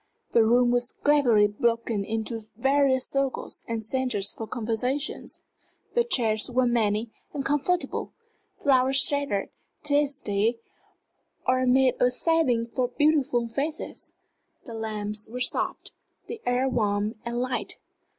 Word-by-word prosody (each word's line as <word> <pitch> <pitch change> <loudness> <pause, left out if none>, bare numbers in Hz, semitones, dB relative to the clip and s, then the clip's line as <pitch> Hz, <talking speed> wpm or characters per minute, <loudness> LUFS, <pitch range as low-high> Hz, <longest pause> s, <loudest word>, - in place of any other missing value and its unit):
The 230 - +5
room 240 +2 +4
was 245 0 0
cleverly 250 -8 +5
broken 230 0 0
into 225 +2 -3 0.2
various 270 0 +3
circles 275 -1 -2
and 225 -1 -3
centres 230 -5 +1
for 225 - -6
conversation; 250 +6 -2 0.7
the 475 - +3
chairs 225 - 0
were 250 +1 +2
many 220 -2 +1 0.2
and 275 - -3
comfortable; 295 +5 -1 0.5
flowers 265 -1 +3
sheltered 280 -8 +1 0.3
tête 290 -1 +3
à 285 -1 -2
têtes 210 +3 +1 0.9
or 255 0 +2
made 260 0 +4
a 250 - +5
setting 255 -4 +1
for 245 +2 -1
beautiful 280 -2 +2
faces; 280 +7 -5 0.5
the 235 - -8
lamps 215 -1 -4
were 245 +3 -6
soft, 250 - -1 0.3
the 460 -1 -7
air 250 +2 +2
warm 210 -4 0
and 235 0 -3
light. 250 0 -2
245 Hz, 130 wpm, -26 LUFS, 225-275 Hz, 0.9 s, The